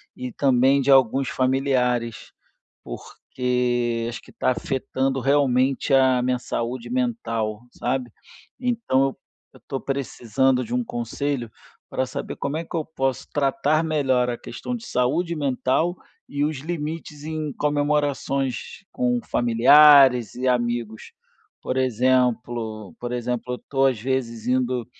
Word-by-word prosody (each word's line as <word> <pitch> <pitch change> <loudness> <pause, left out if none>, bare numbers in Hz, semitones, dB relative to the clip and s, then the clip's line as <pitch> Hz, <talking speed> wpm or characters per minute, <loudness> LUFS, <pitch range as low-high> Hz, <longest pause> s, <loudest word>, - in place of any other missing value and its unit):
e 125 0 -6
também 135 +1 +3
de 135 +1 +2
alguns 135 0 +4
familiares, 130 -3 0 0.5
porque 120 - -2
acho 120 - -7
que - - -17
tá - - +1
afetando 135 +1 -2
realmente 135 0 +2
a 130 -2 +4
minha 125 0 0
saúde 120 0 -4
mental, 115 - -2
sabe. 130 -3 -3 0.5
Então 235 - +1
eu 135 - -3 0.4
eu - - -18
tô 135 - -2
precisando 130 -1 0
de 115 - -6
um 125 0 +1
conselho 120 +2 -3 0.4
pra 130 - -1
saber - - -6
como 140 +2 -3
é 165 - -4
que - - -8
eu 160 - 0
posso 135 -5 -2
tratar 145 +2 +1
melhor 135 -6 +1
a 120 - -3
questão 250 - -6
de 235 -1 -8
saúde 155 - 0
mental 145 +4 0 0.3
e 145 0 -2
os 150 0 -1
limites 155 -1 -5
em 155 -2 -4
comemorações 145 -3 -1
com 250 -1 0
familiares 130 - +6
e 125 - -4
amigos. 120 -3 -1 0.5
Por 130 - -3
exemplo 120 -4 0
por 120 0 -4
exemplo, 125 0 -3
eu - - -4
tô 135 -1 +2
às 130 -3 +2
vezes 120 -2 -2
indo 125 -1 0
130 Hz, 135 wpm, -23 LUFS, 125-145 Hz, 0.5 s, familiares